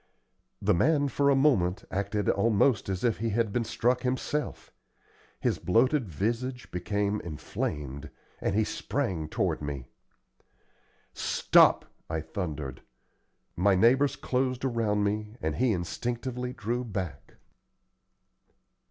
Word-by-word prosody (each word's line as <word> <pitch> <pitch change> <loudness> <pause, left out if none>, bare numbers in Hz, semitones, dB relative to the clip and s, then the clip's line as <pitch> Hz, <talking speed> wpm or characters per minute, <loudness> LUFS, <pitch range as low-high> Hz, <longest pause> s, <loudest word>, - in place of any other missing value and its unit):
The 105 +1 +4
man 145 - +3
for 140 +2 +2
a 140 - +5
moment 115 -11 +2
acted 100 +1 -1
almost 115 0 +3
as 95 -1 -2
if 120 -4 +1
he 115 +1 0
had 110 -1 0
been 120 - +1
struck 125 +2 +1
himself. 130 +3 -2 0.7
His - - 0
bloated 125 +4 +2
visage 120 - -2
became 100 +3 -1
inflamed, 75 -3 -4 0.3
and 95 - -1
he 110 - +3
sprang 80 -6 -2
toward 95 -8 0
me. 70 -3 -4 1.3
"Stop!" - - +4 0.2
I 80 0 -1
thundered. 75 -5 -5 0.7
My 95 +2 +3
neighbors 130 +8 +4
closed 130 0 -1
around 110 -5 +1
me, 105 +1 -2
and 80 -1 -2
he 125 -1 +3
instinctively 120 +7 -3
drew 120 +1 -2
back. 95 - -5
105 Hz, 115 wpm, -28 LUFS, 90-125 Hz, 1.3 s, a